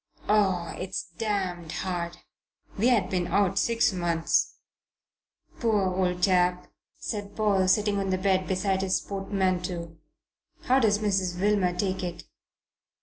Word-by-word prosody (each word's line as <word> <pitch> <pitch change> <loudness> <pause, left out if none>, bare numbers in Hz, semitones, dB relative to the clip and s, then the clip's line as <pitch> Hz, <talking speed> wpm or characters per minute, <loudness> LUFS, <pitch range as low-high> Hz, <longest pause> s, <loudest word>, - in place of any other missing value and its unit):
Oh, 190 -5 +2
it's 185 +1 -3 0.2
damned 185 -6 -2
hard! 175 -2 -3 0.6
We 220 +5 +2
had 225 -7 +3
been 180 -2 0
out 195 +1 +2
six 230 -3 +2
months." 170 -2 0 1.0
"Poor 205 -5 +1
old 180 -1 -1
chap!" 180 -2 +3 0.3
said 205 -2 -5
Paul, 200 -3 +2
sitting 205 +1 +2
on 195 -1 -2
the 185 - +1
bed 185 -1 +1
beside 190 0 0
his 190 -1 +1
portmanteau. 185 -4 -2 0.7
"How 260 +1 +3
does 215 -4 +3
Mrs. 190 -4 -1
Wilmer 195 -3 +2
take 190 0 -1
it?" 175 -1 -5
190 Hz, 130 wpm, -27 LUFS, 180-205 Hz, 1.0 s, had